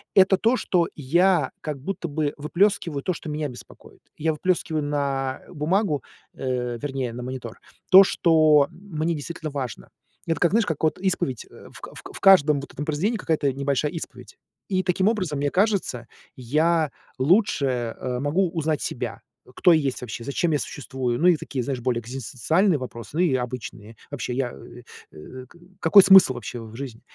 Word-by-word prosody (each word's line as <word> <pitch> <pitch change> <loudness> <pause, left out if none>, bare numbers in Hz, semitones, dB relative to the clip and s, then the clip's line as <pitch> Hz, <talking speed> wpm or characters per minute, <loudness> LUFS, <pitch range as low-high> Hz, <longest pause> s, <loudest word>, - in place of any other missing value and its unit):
это 190 0 +6
то, 230 +5 +2
что 175 -8 +1
я 170 +1 +2
как 150 -3 -5
будто 175 +1 -4
бы 150 -1 -2
выплескиваю 170 -1 0
то, 185 - -1
что 160 - -8
меня 150 0 -2
беспокоит". 125 -1 -14
Я 160 +1 0
выплескиваю 160 -1 -1
на 140 -2 -2
бумагу, 160 -1 0 0.3
э, 125 -2 -3
вернее, 135 -3 -3
на 120 +1 -6
монитор, 125 -3 -7 0.3
то, 195 +1 +10
что 155 -5 +4
мне 170 -3 -4
действительно 155 +2 -6
важно. 130 -8 -6 0.4
Это 165 -2 -1
как, 175 - +3
знаешь, 225 0 +3
как 160 -3 -3
вот 155 - +1
исповедь, 180 - -1
в - - -14
к - - -10
в - - -9
к - - -11
в - - -7
каждом 150 -7 +6
вот 140 - -10
этом 145 - -5
произведении 180 +10 -1
какая-то 150 -6 0
небольшая 140 +2 -1
исповедь. 165 -2 -9 0.3
И 185 -2 +1
таким 185 +2 +1
образом, 185 -10 -2
мне 145 0 0
кажется, 185 - 0 0.3
я 155 +5 +1 0.3
лучше, 155 +2 +2 0.3
э, 125 -1 -3
могу 165 +7 +1
узнать 155 -2 -1
себя, 120 -4 -4 0.3
кто 180 -3 +5
я 155 - +3
есть 135 -2 -2
вообще, 120 -1 -6
зачем 160 +5 -1
я 145 - +1
существую. 130 -5 -4
Ну, 175 - +4
и 180 - +6
такие, 140 -3 -4
знаешь, 130 -1 -3
более 120 -1 0
экзистенциальные 135 - 0
вопросы, 115 -3 -8
ну, 160 - -3
и 175 -7 +3
обычные. 120 -3 -6
Вообще 140 -3 -4
я, 125 -1 -1
э 120 - -13 0.3
э, 125 +12 -11 0.4
какой 195 +5 +8
смысл 190 -9 +7
вообще 120 0 -6
в 110 -1 -11
жизни? 125 -3 -7
150 Hz, 175 wpm, -24 LUFS, 130-175 Hz, 0.4 s, то